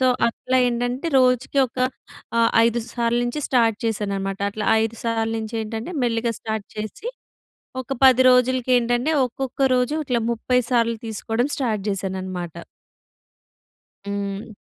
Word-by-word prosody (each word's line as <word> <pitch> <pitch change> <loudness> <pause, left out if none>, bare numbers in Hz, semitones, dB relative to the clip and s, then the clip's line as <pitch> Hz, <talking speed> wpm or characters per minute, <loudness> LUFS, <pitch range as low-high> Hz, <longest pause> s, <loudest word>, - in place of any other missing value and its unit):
So, 260 - +3 0.2
అట్లా 255 +2 -2
ఏంటంటే, 245 +4 -2
రోజుకి 255 +2 +2
ఒక 245 - -12 0.6
ఆహ్, 230 0 +4 0.2
5 235 0 0
సార్లు 235 0 +1
నుంచి 240 +5 -3
స్టార్ట్ 230 -4 +3
చేశానన్నమాట. 200 -3 -2
అట్లా 210 +1 -4 0.2
5 225 0 -3
సార్లు 225 -1 0
నుంచి 220 +1 -6
ఏంటంటే 225 +8 -5
మెల్లిగా 230 0 0
స్టార్ట్ 220 -2 -4
చేసి, 215 - -6 0.7
ఒక 260 +1 -3
10 260 -1 +7
రోజులకి 255 0 +3
ఏంటంటే 245 +5 +1
ఒక్కొక్క 260 +2 -5
రోజు 250 +4 +1
ఇట్లా 245 -2 +1
30 245 +2 0
సార్లు 230 -1 +2
తీసుకోవడం 225 +3 -1
స్టార్ట్ 225 -6 -1
చేశానన్నమాట. 185 -3 -4 1.5
హ్మ్. 200 +2 -4
230 Hz, 130 wpm, -22 LUFS, 215-250 Hz, 1.5 s, 10